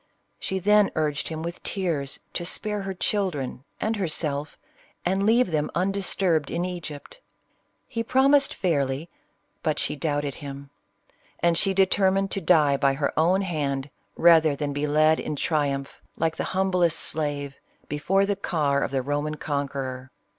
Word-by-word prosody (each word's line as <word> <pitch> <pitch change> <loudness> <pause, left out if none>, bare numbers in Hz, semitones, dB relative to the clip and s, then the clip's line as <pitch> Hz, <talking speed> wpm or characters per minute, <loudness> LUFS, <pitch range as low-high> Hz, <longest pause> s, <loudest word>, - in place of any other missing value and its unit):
She 190 - -2
then 205 +2 +4
'u - - -10
urged 150 -2 -1
him 160 -1 -5
with 170 +1 -6
tears, 165 -9 -2
to - - -3
spare 210 +4 -1
her 195 0 -4
children 170 -10 -2
and 220 +1 0
her 190 -3 -1
self, 150 -2 -3 0.5
and 190 +3 +1
leave 230 -3 +4
them 150 -1 0
undisturbed 185 -4 +1
in 175 +1 -1
Egypt. 175 - -7 0.7
He 230 - -3
prom 265 +4 +3
ised 285 -1 +5
fairly, 145 -3 -1 0.5
but 155 -2 0
she - - -1
doubted 145 -1 -1
him; 140 -1 -8 0.7
and 170 -1 +3
she 195 +3 +3
determined 195 0 +2
to 195 - -1
die 155 -5 +4
by 135 -1 +2
her 140 0 -1
own 175 +5 +3
hand, 140 -6 -2 0.2
rather 160 -3 +5
than 145 0 -3
be 145 +1 -1
led 155 +2 +4
in 150 - -3
triumph, 140 -2 -1 0.2
like 160 0 0
the - - -3
humblest 180 -4 +2
slave, 145 -3 0 0.3
before 190 +7 +1
the 200 0 0
car 145 -7 0
of - - 0
the 135 -1 -1
Roman 145 +2 -2
conqueror. 135 -3 -4
160 Hz, 160 wpm, -25 LUFS, 145-190 Hz, 0.7 s, ised